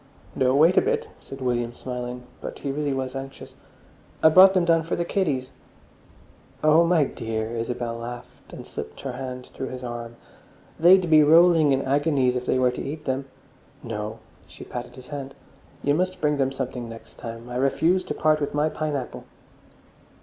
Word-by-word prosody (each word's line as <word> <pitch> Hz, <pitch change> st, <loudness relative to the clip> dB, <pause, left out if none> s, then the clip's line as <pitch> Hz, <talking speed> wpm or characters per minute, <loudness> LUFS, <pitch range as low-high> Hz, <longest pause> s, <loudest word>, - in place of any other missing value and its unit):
"No, 130 Hz, 0 st, +2 dB
wait 165 Hz, +6 st, +5 dB
a -, -, +8 dB
bit," 460 Hz, +2 st, -1 dB
said 135 Hz, 0 st, -10 dB
William, 120 Hz, -2 st, -1 dB
smiling. 125 Hz, -1 st, -6 dB, 0.2 s
But -, -, -6 dB
he 140 Hz, -, -4 dB
really 145 Hz, 0 st, -2 dB
was 130 Hz, -1 st, -3 dB
anxious. 135 Hz, 0 st, -8 dB, 0.7 s
"I 160 Hz, -, +9 dB
brought 190 Hz, +4 st, +8 dB
them 180 Hz, -2 st, +3 dB
down 165 Hz, -1 st, +4 dB
for 165 Hz, -, -3 dB
the 170 Hz, -, -2 dB
kiddies." 145 Hz, -10 st, -1 dB, 1.1 s
"Oh, 155 Hz, +2 st, +6 dB
my 165 Hz, -3 st, +4 dB
dear!" 115 Hz, -4 st, -4 dB
Isabel 115 Hz, 0 st, -3 dB
laughed, 120 Hz, +1 st, -9 dB
and -, -, -9 dB
slipped -, -, -8 dB
her 135 Hz, -, -4 dB
hand 125 Hz, 0 st, -7 dB
through 130 Hz, -, -5 dB
his 130 Hz, 0 st, -7 dB
arm. 120 Hz, -1 st, -6 dB, 0.6 s
"They'd 180 Hz, +2 st, +6 dB
be 155 Hz, -1 st, +6 dB
rolling 160 Hz, 0 st, +6 dB
in 135 Hz, 0 st, +1 dB
agonies 140 Hz, -2 st, +1 dB
if 125 Hz, 0 st, -3 dB
they -, -, +2 dB
were 125 Hz, -1 st, +3 dB
to 125 Hz, -, -6 dB
eat 155 Hz, +2 st, -6 dB
them. 135 Hz, 0 st, -1 dB, 0.6 s
No"—she 110 Hz, -1 st, -8 dB
patted 120 Hz, 0 st, -7 dB
his 130 Hz, -1 st, -13 dB
hand—"you 140 Hz, 0 st, -5 dB
must 185 Hz, +4 st, -1 dB
bring 150 Hz, -1 st, +1 dB
them 135 Hz, -1 st, +1 dB
something 125 Hz, -3 st, -5 dB
next 115 Hz, 0 st, -12 dB
time. 115 Hz, +1 st, -8 dB
I 125 Hz, 0 st, -4 dB
refuse 165 Hz, +8 st, +2 dB
to -, -, -4 dB
part 155 Hz, 0 st, +2 dB
with 145 Hz, -, -2 dB
my 150 Hz, +1 st, +2 dB
pineapple." 150 Hz, -5 st, -4 dB
135 Hz, 175 wpm, -24 LUFS, 125-155 Hz, 1.1 s, I